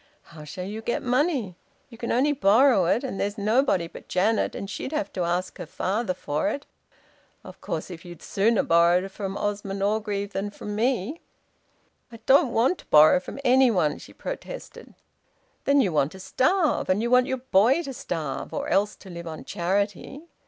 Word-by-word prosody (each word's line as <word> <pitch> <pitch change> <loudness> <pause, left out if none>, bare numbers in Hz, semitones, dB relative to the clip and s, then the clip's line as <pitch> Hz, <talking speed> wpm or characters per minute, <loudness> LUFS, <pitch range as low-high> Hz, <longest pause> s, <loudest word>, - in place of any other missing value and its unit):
How 155 -2 -10
shall 180 +5 -6
you 210 +3 -6
get 235 +1 -2
money? 255 - 0 0.4
You 230 - -12
can 235 - -3
only 270 +5 +3
borrow 235 -4 +4
it 220 +9 +1
and 255 -7 -4
there's 205 +2 -2
nobody 215 -3 +2
but - - -13
Janet, 210 +4 +1
and 195 - -5
she'd 210 - -5
have 205 -9 -2
to 185 - -3
ask 175 +2 -2
her - - -6
father 190 +4 -2
for 150 -3 -1
it. 285 - -5 0.8
Of - - -13
course, - - -4
if 165 -2 -9
you'd 175 -2 -11
sooner 215 +2 +2
borrow 170 +2 +3
from 195 0 -5
Osmond 200 -1 -3
Orgreave 205 -1 -1
than 200 +2 -2
from 205 0 -7
me 245 - -1 0.5
" - - -42
"I 230 - -10
don't 270 -1 +5
want 250 +11 +2
to - - -15
borrow 155 +3 +7
from 185 - -9
any 260 +1 +5
one," 160 -9 +1
she - - -13
protested. - - -8 0.7
"Then 280 0 +4
you 195 - +1
want 145 -1 +1
to 190 - -11
starve! 310 - +1
And 195 +4 +2
you 235 - -1
want 250 0 +5
your 260 - -1
boy 250 - +3
to 275 -3 -6
starve 160 - -5
or 285 +1 -3
else 205 -2 +1
to 195 - -14
live 170 0 -8
on 160 -1 -7
charity! 200 - -2
205 Hz, 190 wpm, -25 LUFS, 185-255 Hz, 0.8 s, borrow